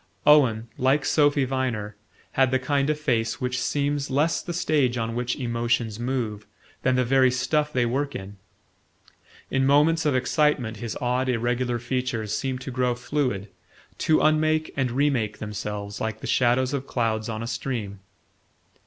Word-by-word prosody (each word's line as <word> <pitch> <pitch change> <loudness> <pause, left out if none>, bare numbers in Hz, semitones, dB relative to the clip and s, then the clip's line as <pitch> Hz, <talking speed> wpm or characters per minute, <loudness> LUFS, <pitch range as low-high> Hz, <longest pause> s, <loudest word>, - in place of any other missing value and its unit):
Owen, 125 -7 +5
like 135 +2 +2
Sophy 145 -1 +3
Viner, 125 -6 -2 0.4
had 135 -1 +3
the 130 - +2
kind 140 +2 0
of 155 0 0
face 120 -6 0
which 125 0 -2
seems 145 0 -1
less 145 +5 +1
the 175 - -6
stage 150 -7 +1
on 115 0 -2
which 120 +1 -1
emotions 120 -3 -1
move 120 -4 -3 0.3
than 130 0 +2
the 125 0 +2
very 130 +1 +4
stuff 140 +4 0
they 125 -4 +1
work 140 +4 -1
in. 100 +1 -7 1.1
In 135 - +2
moments 150 +4 +4
of 145 - +2
excitement 130 -3 +1
his 115 -2 -5
odd 125 +1 0
irregular 120 0 0
features 120 -3 -2
seemed 130 +1 -3
to 130 - -6
grow 125 -1 0
fluid, 125 -6 -2 0.5
to 155 - +3
unmake 155 0 +2
and 135 -2 0
remake 120 -5 0
themselves 105 -1 -5
like 110 0 -3
the - - -6
shadows 125 +2 +2
of 135 -1 -3
clouds 110 -2 -1
on 110 0 -4
a - - -4
stream. 110 -4 -4
125 Hz, 160 wpm, -25 LUFS, 115-140 Hz, 1.1 s, Owen